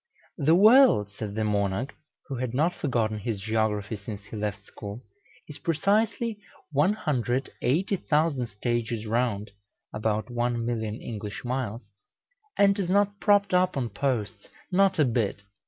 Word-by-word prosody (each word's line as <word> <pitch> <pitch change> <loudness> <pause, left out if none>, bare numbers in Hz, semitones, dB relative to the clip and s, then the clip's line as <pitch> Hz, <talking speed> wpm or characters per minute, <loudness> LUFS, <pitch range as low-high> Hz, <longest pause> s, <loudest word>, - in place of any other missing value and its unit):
"The 155 +3 +4
world," 215 - +6
said 105 0 -6
the 110 - 0
monarch, 105 +3 0 0.3
who 135 - -4
had 125 -1 -3
not 160 +6 +2
forgotten 110 -6 -1
his 105 -1 -3
geography 110 0 -1
since 100 0 -8
he 105 +2 -10
left 105 -1 -4
school, 105 +5 -8 0.4
"is - - -10
precisely 210 +6 +1 0.3
180,000 150 - 0
stages 115 +1 -2
round 110 -2 -1 0.4
(about 110 0 -1
1,000,000 120 -2 -2
English 105 0 -6
miles), 120 -3 -3 0.7
and 200 0 +4
it - - +2
is 180 - -3
not 200 +1 +2
propped 205 -2 +3
up 180 -3 +3
on 120 -3 -1
posts 110 -2 -2 0.2
not 195 +1 +3
a 150 - +4
bit! 115 -4 -1
120 Hz, 135 wpm, -27 LUFS, 105-165 Hz, 0.7 s, world